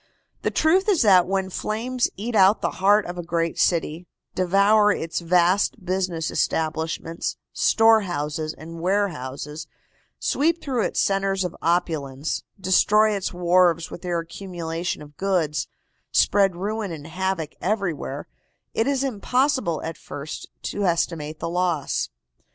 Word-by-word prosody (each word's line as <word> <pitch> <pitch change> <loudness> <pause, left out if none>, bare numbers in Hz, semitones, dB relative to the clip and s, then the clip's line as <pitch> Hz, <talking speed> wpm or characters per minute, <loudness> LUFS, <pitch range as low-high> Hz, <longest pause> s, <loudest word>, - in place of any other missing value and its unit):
The - - 0
truth 370 +6 +2
is 375 -10 +4
that 185 -5 +6
when 190 0 -1
flames 240 +6 -1
eat 230 +5 -4
out 200 0 +5
the - - -2
heart 205 +2 +5
of 175 0 -6
a - - -4
great 165 0 -1
city, 170 0 +1 0.3
devour 200 +3 +4
its 165 -4 -2
vast 180 +4 +2
business 180 -3 -1
establishments, 160 +1 -2 0.2
storehouses 160 -9 +2
and 165 +1 -9
warehouses, 155 -6 -2 0.5
sweep 330 +4 +1
through 255 -7 -1
its - - -1
centres 195 -1 +1
of 180 - -4
opulence, 160 -5 -1 0.2
destroy 210 +3 +4
its 195 - -2
wharves 175 -1 +2
with - - -8
their 175 -2 -1
accumulation 170 -1 -4
of 145 -1 -16
goods, 175 -6 0 0.4
spread 195 -3 +3
ruin 205 +2 -3
and 150 -3 -7
havoc 180 -2 -2
everywhere, 195 -6 -2 0.5
it 225 - +1
is 275 -1 +1
impossible 255 - 0
at 165 0 -5
first 145 +1 -7
to 205 - -3
estimate 165 -4 -1
the - - -4
loss. 170 -4 -1
180 Hz, 135 wpm, -24 LUFS, 165-205 Hz, 0.5 s, that